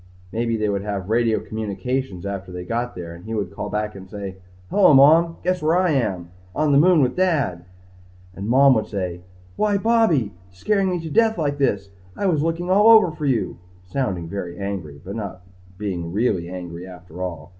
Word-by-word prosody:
Maybe 115 0 -1
they 105 -1 0
would 100 -1 -1
have 100 -2 -4
radio 115 -1 +2
communication 110 -1 -4
after 100 -2 -5
they 90 0 -6
got 120 +5 -3
there 85 -2 -7
and 85 +1 -13
he 110 +1 -4
would 100 -4 -2
call 105 +1 -5
back 105 0 -2
and 95 -1 -11
say, 100 -3 -7 0.3
Hello, 190 -8 +6
Mom! 160 +5 +6
Guess 180 +1 0
where 160 +3 +2
I 185 -2 +2
am? 95 - -1 0.2
On 150 0 +2
the 140 - +6
moon 170 -2 +5
with 125 - 0
Dad! 145 - 0 0.7
And 100 +3 -6
Mom 135 +2 +6
would 110 -3 0
say, 90 -4 -4 0.4
Why, 210 -1 +2
Bobby! 195 - +2 0.2
Scaring 195 - 0
me 180 -1 -1
to 160 - -6
death 225 +3 +3
like 145 -3 -1
this! 100 -8 0 0.3
I - - -2
was 165 -6 +2
looking 165 +3 -1
all 205 +4 +6
over 220 -6 +7
for 155 -1 -4
you. 125 -8 -1 0.3
Sounding 90 -5 -2
very 90 -1 -5
angry 95 -8 -5
but 100 - -6
not 100 -4 -6 0.3
being 90 -5 -4
really 95 -4 0
angry 90 -1 -7
after 90 -1 -11
all. 90 -2 -5
110 Hz, 195 wpm, -22 LUFS, 95-155 Hz, 0.7 s, over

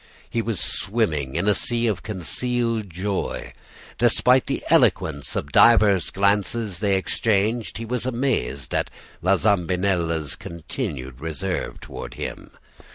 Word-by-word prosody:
He 115 - -1
was 115 -5 -2
swimming 80 - -1
in 90 +4 0
a 105 - +5
sea 120 +4 +1
of 105 -5 0
concealed 115 +2 -2
joy. 95 +3 -3 0.5
Despite 125 +2 +4
the - - -2
eloquence 70 0 +2
of 70 - -3
divers 105 -5 +5
glances 100 0 0
they 100 -2 +2
exchanged, 110 +3 0
he 115 - -5
was 125 +2 -2
amazed 115 - -1
at - - 0 0.3
La 95 +3 +4
Zambinella's 90 -5 +1
continued 65 -6 -6
reserve 85 +3 -3
toward - - -8
him. - - -6
100 Hz, 125 wpm, -23 LUFS, 85-115 Hz, 0.5 s, a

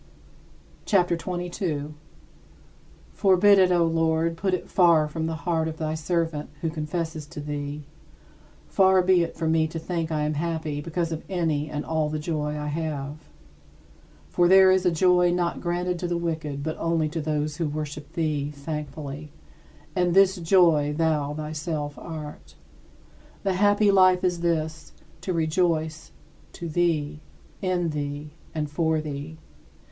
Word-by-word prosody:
CHAPTER 180 -4 +3
XXII 165 +3 -7 0.2
32. 155 -5 -3 1.2
Forbid 195 +1 +5
it, 185 -1 +5
O 175 -1 +4
Lord, 165 0 +1
put 185 +2 0
it - - -7
far 170 -4 +4
from 160 +1 -3
the 165 - -2
heart 160 +1 -1
of 160 0 -5
thy 155 -1 -2
servant, 160 -1 -2
who 165 - -1
confesses 160 0 -4
to 170 0 -9
thee 145 0 -5 0.8
far 190 -1 +4
be 185 -1 +4
it 170 - -3
from 160 -1 0
me 160 -1 +3
to 160 - -6
think 165 0 -3
I 155 -1 0
am 150 +1 0
happy 155 -1 -2
because 165 +1 -2
of 160 0 -3
any 160 -5 -1
and 150 -1 -4
all 160 -2 0
the 155 - -2
joy 150 -1 -2
I 150 - -4
have. 150 -2 -3 1.1
For 175 - +2
there 190 +1 +7
is 185 -1 +3
a - - +4
joy 180 +1 +4
not 175 -1 -1
granted 175 0 -1
to 175 - -2
the 175 0 -1
wicked 155 -4 -3
but 155 +1 -3
only 165 -2 +1
to 160 +1 -3
those 150 0 -2
who 165 -3 -1
worship 150 0 -6
thee 150 -3 -1
thankfully 150 0 -6 0.6
and 180 -1 +1
this 195 0 +5
joy 165 -4 +3
thou 150 -3 +1
thyself 155 -1 -4
art. 155 -3 -8 0.9
The 195 -2 +1
happy 205 +2 +4
life 185 -2 +5
is 180 -2 +1
this 155 -3 -2 0.3
to 185 - -3
rejoice 160 -1 0 0.4
to 170 - -6
thee, 155 -3 0 0.4
in 180 -3 0
thee, 145 0 -4 0.2
and 150 -1 -1
for 160 +1 0
thee. 150 +1 -6
160 Hz, 155 wpm, -25 LUFS, 150-175 Hz, 1.2 s, there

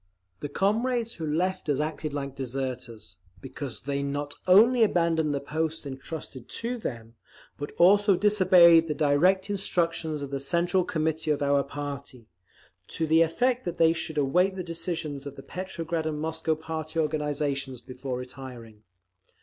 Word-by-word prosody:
The 145 - -5
comrades 230 - 0
who 160 -6 -5
left 175 +2 -1
us 140 - +1
acted 155 0 -3
like 140 -1 -4
deserters, 125 -8 -5 0.2
because 135 -1 -6
they 140 +1 -2
not 145 +1 -3
only 230 +7 +6
abandoned 165 -7 +2
the 140 - -1
posts 160 +2 -3
entrusted 135 -2 -7
to 240 +1 -3
them, 115 - -6 0.4
but 145 - -6
also 200 +3 +5
disobeyed 180 -4 +6
the 150 - -2
direct 170 +7 +3
instructions 165 -6 0
of 140 - -6
the 140 - -2
Central 170 +6 +1
Committee 160 -1 -1
of 145 -1 +1
our 140 0 +3
party, 140 -3 -7 0.6
to 165 - -2
the 160 +1 +4
effect 245 +10 +1
that 175 -1 -4
they 165 0 +5
should 160 -1 -4
await 180 +7 +2
the 185 - -4
decisions 165 -4 -4
of 140 - -8
the - - -10
Petrograd 170 -3 -4
and 150 -1 -3
Moscow 160 0 -1
party 160 0 -6
organisations 145 -4 -1
before 130 +1 -6
retiring. 125 -4 -9
155 Hz, 150 wpm, -27 LUFS, 140-175 Hz, 0.6 s, only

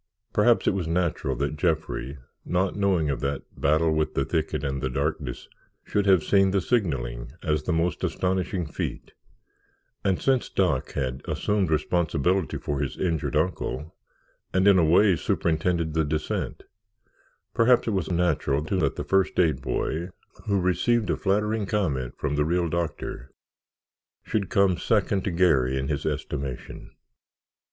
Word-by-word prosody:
Perhaps - - +4
it - - +3
was 95 -4 -2
natural 85 -5 0
that 70 +3 -2
Jeffrey, 80 -4 -1 0.3
not 95 +2 0
knowing 95 -7 +1
of 70 - -3
that 70 0 -2
battle 80 +3 +2
with 80 0 -1
the - - +1
thicket 80 -2 -1
and 70 -1 -2
the 65 - -1
darkness 70 -1 -3 0.4
should 100 -1 0
have 95 -5 +5
seen 95 -1 +4
the 95 +1 +2
signalling 65 - -1
as 75 -1 +1
the 90 - -2
most 85 0 0
astonishing 95 -1 -1
feat, 75 - -5 0.9
and 95 -2 +1
since 130 -2 +1
Doc 90 -9 0
had 65 0 -2
assumed 105 -4 0
responsibility 85 +2 +1
for 70 -1 -3
his 70 -2 -3
injured 85 -6 -1
uncle 80 -1 -1 0.6
and 95 +1 +4
in 100 -2 +7
a - - +4
way 90 +4 +5
superintended 80 0 0
the 80 0 +2
descent, 75 0 -3 0.9
perhaps 120 +1 +4
it - - +1
was 95 -6 -1
natural 85 -5 +1
too 95 +3 -1
that 75 -5 +1
the - - -4
first 95 -1 +1
aid 80 -7 +2
boy, 85 +5 -2 0.4
who 100 -2 +2
received 95 +6 +1
a - - +1
flattering 105 +1 0
comment 75 - -1
from 75 -1 -2
the 75 - +2
real 85 +2 0
doctor, 80 -6 -4 0.9
should 105 -3 -2
come 100 -5 +3
second 100 -3 +1
to - - -1
Garry 80 -8 +2
in 65 0 -2
his 70 -2 -2
estimation. 70 -3 -5
85 Hz, 155 wpm, -26 LUFS, 75-95 Hz, 0.9 s, in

